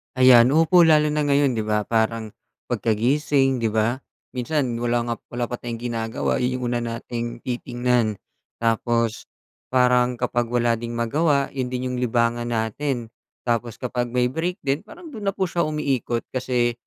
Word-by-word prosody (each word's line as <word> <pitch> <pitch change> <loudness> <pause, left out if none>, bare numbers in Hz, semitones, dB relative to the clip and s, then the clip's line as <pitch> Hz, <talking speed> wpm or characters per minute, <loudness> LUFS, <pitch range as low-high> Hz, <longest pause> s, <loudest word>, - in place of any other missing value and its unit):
Ayan, 130 0 +7
opo, 170 +2 +6
lalo 150 -1 +4
na 150 0 0
ngayon 140 -1 +3
'di 110 - 0
ba 105 0 +1
parang 110 0 0 0.4
pagkagising, 135 +4 +1
'di 115 - +1
ba 110 +3 0 0.3
minsan 125 -1 -1
wala 120 0 +1
nga 115 - 0 0.2
wala 120 -1 -2
pa 120 - -3
tayong 120 -1 -5
ginagawa 115 -1 -1
yung 125 0 -1
una 120 - 0
nating 120 0 -5
titingnan 120 -2 0 0.4
tapos, 115 0 0 0.4
parang 125 -1 +3
kapag 120 -1 0
wala 120 -1 +2
ding 120 0 -5
magawa 140 +4 +1
'yon 130 -2 -2
din 125 0 -3
yung 125 - -3
libangan 120 0 +1
natin, 115 +1 -2 0.3
tapos 120 -1 -1
kapag 125 -1 -2
may 125 +1 +1
break 170 +5 -2
din 140 +2 +1
parang 325 +9 -12
do'n 215 -6 -6
na 195 - 0
po - - 0
siya 175 -1 -1
umiikot 135 -6 -1
kasi, 125 -2 0
125 Hz, 160 wpm, -23 LUFS, 115-135 Hz, 0.4 s, Ayan